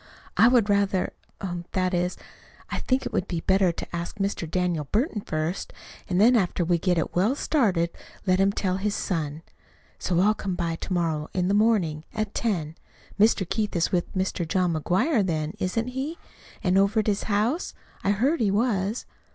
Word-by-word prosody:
"I 225 - +6
would 240 -4 +4
rather 200 -2 +1 0.3
er 175 -2 -3
that 185 0 +1
is, 180 +1 0 0.5
I - - -1
think 260 +1 0
it - - -4
would 185 - 0
be 170 -2 -2
better 190 -1 +3
to 170 - -7
ask 170 +4 -5
Mr. 195 -5 -2
Daniel 175 -3 0
Burton 215 - 0
first, 155 +1 -3 0.4
and 180 0 +1
then 235 +5 +6
after 180 -4 +1
we 170 0 +2
get 180 0 +1
it 165 - -1
well 205 +9 +3
started 195 - +1 0.3
let 185 -1 +3
him 195 +1 +4
tell 190 -2 -1
his 205 +1 -1
son. 160 -3 -2 0.6
So 175 -2 0
I'll 205 +3 +4
come 190 -4 -4
to 165 +1 -3
morrow 160 -3 -1
in 180 0 +1
the - - +2
morning 200 -8 +2
at 215 -2 -2
ten. 165 -9 -1 0.4
Mr. 210 -3 +4
Keith 210 0 -1
is 170 - +1
with 175 -2 0
Mr. 185 -2 -1
John 180 0 +1
McGuire, 200 - +2
then, 155 -4 -1
isn't 225 +6 -1
he? 270 +6 -4 0.5
And 190 -1 +3
over 200 +3 +3
at - - -7
his 205 -2 0
house? 220 - 0 0.3
I - - +1
heard 255 +11 +2
he 215 - +2
was." 205 0 0
190 Hz, 185 wpm, -26 LUFS, 175-215 Hz, 0.6 s, I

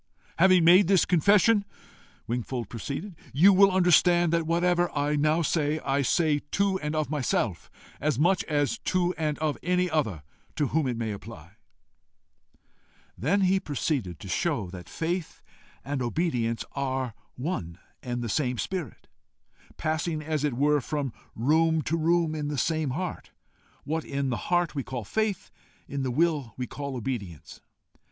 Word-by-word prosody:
"Having 185 -1 +6
made 180 +2 +7
this 195 -2 +4
confession," 200 +4 +4 0.6
Wingfold 120 -1 -3
proceeded, 140 - -5 0.2
"you 185 +8 +6
will 195 +1 +6
understand 175 -2 +4
that 165 -1 +1
whatever 175 +1 +2
I 145 +1 +1
now 155 +3 +2
say, 155 -1 +1
I 140 +1 +1
say 150 +2 +2
to 200 -1 +1
and 150 -1 -3
of 155 -1 -1
myself 120 - -1 0.3
as 150 -4 0
much 175 +6 +3
as 145 -3 0
to 180 -1 0
and 155 -3 -2
of 155 -2 -1
any 180 +1 +1
other 110 - -1 0.3
to 145 -4 0
whom 155 -3 +1
it 120 -2 -2
may 115 -2 -2
apply." 95 -5 -10 1.0
He - - -33 0.6
then 190 - +2
proceeded 135 - -2
to - - -9
show 110 - -1
that 90 -2 -10
faith 170 +1 -3 0.4
and 140 -1 -2
obedience 120 -4 -1
are 130 -3 -2 0.2
one 125 - -4 0.2
and 120 -1 -4
the - - -3
same 125 +2 0
spirit, 180 0 -5 0.7
passing 155 0 -2
as 155 -1 -2
it 145 -5 0
were 145 +2 +2
from 140 0 -3 0.2
room 160 +6 +2
to 160 - -1
room 165 0 +2
in 150 -2 -3
the 145 -1 -3
same 155 +2 0
heart: 175 +7 -4 0.5
what 160 +3 -2
in 140 -1 -2
the 115 - -1
heart 175 -2 +2
we 140 - -2
call 125 -2 -5
faith, 205 - -2 0.4
in 140 0 -4
the 130 - -1
will 145 -5 0
we 125 - -2
call 140 +2 -6
obedience. 105 - -6
150 Hz, 155 wpm, -27 LUFS, 130-170 Hz, 1.0 s, made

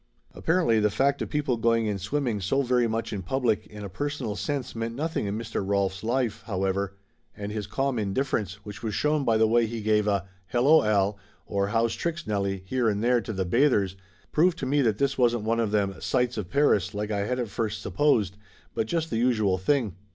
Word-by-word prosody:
Apparently 165 -10 +2
the 105 0 +3
fact 140 +7 +1
of - - -3
people 145 -5 0
going 115 0 +2
in 105 -2 -1
swimming 115 +1 -1
so 135 +9 +1
very 125 -2 +2
much 115 0 -2
in 100 - -3
public 115 +3 0
in 105 -1 -9
a - - -4
personal 145 0 -3
sense 140 +1 -3
meant 115 0 -4
nothing 155 -5 -2
in 100 +2 -2
Mr. 110 -2 -3
Rolf's 95 -1 0
life, 120 -1 0
however, 100 -1 -1 0.4
and 100 0 -5
his 105 -2 -4
calm 135 -3 -1
indifference, 105 -2 -1
which 105 +3 -8
was 110 -3 -3
shown 150 -1 +1
by 115 -3 +3
the 110 - +4
way 115 +1 +3
he 115 +1 -4
give 105 0 +2
a 100 -2 0 0.2
"Hello, 135 - +5
Al," 100 -1 +1 0.3
or 100 -1 -1
"How's 115 +2 +1
tricks, 170 0 -3
Nellie?" 100 -2 -1
here 120 +3 +1
and 105 +1 -1
there 120 0 +3
to 115 - -5
the 95 -3 -2
bath 130 +10 +3
ers, 95 -2 0 0.4
proved 175 +2 +3
to 135 - -3
me 140 +2 +2
that 110 -5 +2
this 140 +1 0
wasn't 120 -3 +3
one 115 +1 0
of 115 -2 +1
them 100 -2 +1
Sights 125 -1 0
of 100 -5 -4
Paris 105 -8 +2
like 105 +1 -3
I 100 -1 -1
had 125 - -1
at 120 -3 -2
first 110 +1 -2
supposed, 110 -10 +1 0.4
but 110 - -1
just 165 +4 -1
the 115 - 0
usual 110 -6 +2
thing. 115 0 +1
110 Hz, 215 wpm, -26 LUFS, 100-130 Hz, 0.4 s, Hello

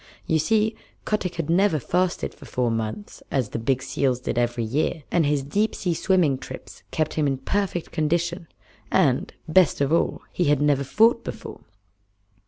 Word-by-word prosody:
You 160 - +2
see, 220 +6 +2 0.3
Kotick 195 -4 -1
had 165 -3 -3
never 180 +1 +3
fasted 180 +6 -1
for 145 - -14
four 125 -3 -1
months 115 - -4
as 130 -6 0
the - - -4
big 130 +3 0
seals 130 -3 0
did 125 - -3
every 120 0 0
year, 145 +7 -1
and 165 -4 +3
his 145 -1 +1
deep 205 +10 0
sea 180 -3 -1
swimming 165 -7 +2
trips - - -10
kept 155 -1 -1
him 150 -2 +1
in 135 -1 0
perfect 180 +4 -2
condition, 170 +2 -1 0.4
and, - - +2 0.2
best 170 +1 +4
of 140 +2 +1
all, 165 - +1
he 175 - +1
had 145 -2 +3
never 145 -2 +2
fought 230 - +3
before. - - -7
155 Hz, 175 wpm, -24 LUFS, 135-180 Hz, 0.4 s, best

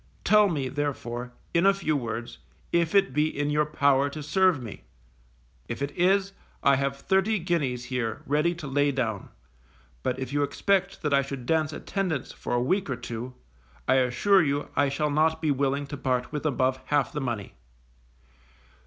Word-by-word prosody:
Tell 210 -1 +5
me, 145 -6 -1
therefore, 125 -3 -3 0.2
in 170 +3 +4
a 195 - +5
few 155 -6 0
words, 120 -3 -4 0.3
if 170 +1 +1
it 195 -9 +4
be 150 +2 +2
in 145 -1 -2
your 150 0 +2
power 140 -2 +3
to 150 +1 -7
serve 185 +1 +3
me. 115 -5 -8 0.9
If 120 +4 -4
it 140 - -2
is, 195 +2 +2 0.3
I 140 - +5
have 140 0 -1
thirty 190 +8 +1
guineas 150 -9 -1
here 120 -3 -3
ready 150 +4 +1
to 165 - -8
lay 145 +1 +2
down, 115 -7 -2 0.7
but 125 - -1
if 130 +1 -5
you 145 - +1
expect 190 +7 0
that 150 -2 +1
I 140 - +5
should 135 -2 -6
dance 155 +1 +1
attendance 180 -4 -3
for - - -5
a - - +2
week 185 +5 0
or 130 - -1
two, 120 +1 -6 0.5
I - - +4
assure 130 +11 +4
you 145 -1 -1
I 145 -1 +3
shall 150 +2 -1
not 160 +2 +2
be 155 -2 +1
willing 140 +1 0
to 145 +1 -7
part 125 -2 -1
with 150 0 -2
above 130 -2 +1
half 145 -2 +1
the 150 - -2
money. 120 -6 -4
145 Hz, 180 wpm, -27 LUFS, 130-160 Hz, 0.9 s, Tell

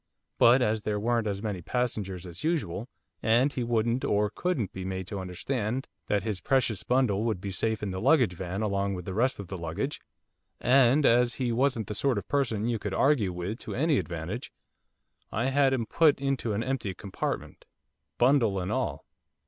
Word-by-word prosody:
But 125 +2 +6
as 110 -2 +1
there 105 -1 -1
weren't 115 0 +1
as 100 0 -3
many 100 -5 -3
passengers 100 -5 -2
as 90 +1 -8
usual, 135 - -1 0.3
and 120 +5 +3
he 125 - -2
wouldn't 115 +1 0
or 105 0 +1
couldn't 135 - -1
be 95 - -5
made 95 0 -4
to 100 - -4
understand 110 +7 -3 0.2
that 100 -2 +1
his 105 -5 -3
precious 120 -5 +1
bundle 120 -5 +1
would 110 -5 0
be 100 +1 -5
safe 110 +3 -1
in 100 - -2
the 95 0 -4
luggage 130 - +4
van 95 +4 -4
along 100 -1 0
with 90 -1 -7
the 95 - -4
rest 125 +6 +1
of 100 - -6
the 95 0 -6
luggage, 85 - -3 0.6
and 135 +3 +4
as 120 +1 +4
he 125 -3 -1
wasn't 120 -2 +1
the 105 - -5
sort 130 +2 +1
of 100 - -4
person 115 -7 0
you 115 -2 0
could 100 -1 -3
argue 135 -9 +3
with 90 +6 -4
to - - -6
any 150 +2 +2
advantage, 90 +7 -5 0.8
I 120 +5 0
had 140 -1 +4
him 125 -4 0
put 155 +3 +3
into 135 -5 -1
an 105 +3 -1
empty 125 -8 -2
compartment, 95 +2 -5 0.5
bundle 120 -6 +3
and 90 - -3
all. - - -2
110 Hz, 190 wpm, -28 LUFS, 95-130 Hz, 0.8 s, But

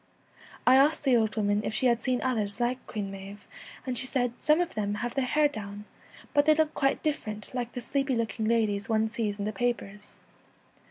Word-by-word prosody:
I 255 +1 +7
asked 290 +4 +4
the 265 -3 +4
old 220 -3 +1
woman 205 -1 +1
if 215 - -3
she 260 - +1
had 235 -2 +3
seen 255 0 0
others 220 -5 -1
like 245 +1 -1
Queen 205 -3 -4
Maive, 195 +1 -9 0.4
and 255 -1 -2
she 260 - -1
said, 245 -2 0
' - - -31
Some 305 +2 +4
of 350 -1 -1
them 205 -1 -1
have 235 +3 -3
their 270 -2 0
hair 300 +3 +4
down, 205 -5 -7 0.5
but 290 +1 +3
they 310 - +7
look 310 0 +1
quite 275 -1 0
different, 220 -10 -3
like 245 -2 -3
the 245 - -4
sleepy 270 +2 0
looking 225 -1 -1
ladies 215 -3 +1
one 220 0 +1
sees 220 -3 -2
in 200 - -3
the 215 - -2
papers. 210 -2 -3
235 Hz, 215 wpm, -28 LUFS, 210-260 Hz, 0.5 s, I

